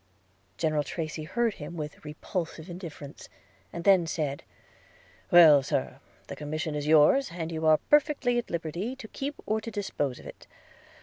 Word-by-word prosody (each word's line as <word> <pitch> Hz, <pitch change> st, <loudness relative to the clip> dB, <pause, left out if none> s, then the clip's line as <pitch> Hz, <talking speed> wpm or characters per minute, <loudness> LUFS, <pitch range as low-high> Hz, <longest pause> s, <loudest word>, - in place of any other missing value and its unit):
General 155 Hz, -2 st, +1 dB
Tracy 155 Hz, +1 st, -5 dB
heard 235 Hz, +6 st, 0 dB
him 165 Hz, +1 st, -8 dB
with 150 Hz, -1 st, -7 dB
repulsive 160 Hz, +2 st, -5 dB
indifference, 160 Hz, -5 st, -9 dB, 0.4 s
and 170 Hz, -, -6 dB
then 185 Hz, -3 st, +5 dB
said 150 Hz, -4 st, -2 dB, 0.4 s
– -, -, -29 dB
'Well, 160 Hz, -5 st, +8 dB
Sir, 135 Hz, -, -2 dB, 0.3 s
the -, -, -7 dB
commission 155 Hz, +1 st, -4 dB
is 150 Hz, 0 st, -3 dB
yours, 160 Hz, -, +5 dB
and 165 Hz, -1 st, -4 dB
you 160 Hz, -1 st, -1 dB
are 155 Hz, 0 st, +6 dB
perfectly 285 Hz, -, +2 dB
at 240 Hz, -, -6 dB
liberty 170 Hz, -, -3 dB
to 260 Hz, -4 st, -10 dB
keep 275 Hz, +5 st, -5 dB
or 220 Hz, +1 st, 0 dB
to 230 Hz, -, -6 dB
dispose 190 Hz, -, -3 dB
of -, -, -14 dB
it. -, -, -12 dB
165 Hz, 165 wpm, -28 LUFS, 150-205 Hz, 0.4 s, Well